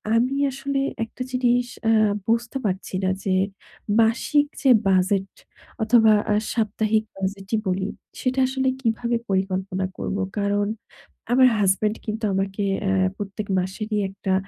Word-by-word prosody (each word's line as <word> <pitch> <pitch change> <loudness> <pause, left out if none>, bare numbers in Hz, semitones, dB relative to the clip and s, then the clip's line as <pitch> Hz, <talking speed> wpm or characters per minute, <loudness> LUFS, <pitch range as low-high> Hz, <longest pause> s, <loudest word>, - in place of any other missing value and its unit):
আমি 250 +4 +2 0.2
আসলে 275 +1 -2 0.2
একটা 230 - -13
জিনিস 245 -1 +2 0.2
আ - - +5 0.4
বুঝতে 230 +3 0
পারছিনা 185 0 -1 0.2
যে 190 -1 +2 0.7
মাসিক 275 +6 +2 0.2
যে 270 - +5 0.2
বাজেট 190 +1 +2 0.5
অথবা 225 -1 +5 0.2
আ - - +3 0.2
সাপ্তাহিক 220 -1 +1
বাজেটই 195 +2 -2
বলি, 190 +1 0 0.3
সেটা 255 +1 0
আসলে 265 0 -1
কিভাবে 235 0 0
পরিকল্পনা 190 0 -1
করব। 200 - -3 0.2
কারণ 205 0 +1 0.6
আমার 255 +1 +6
হাসব্যান্ড 205 +3 +2
কিন্তু 220 +1 -4
আমাকে 195 +1 -1 0.3
আ - - +2 0.3
প্রত্যেক 205 +1 -5
মাসেরই 210 +4 -3
একটা 195 -1 -2
215 Hz, 125 wpm, -23 LUFS, 195-240 Hz, 0.7 s, আমার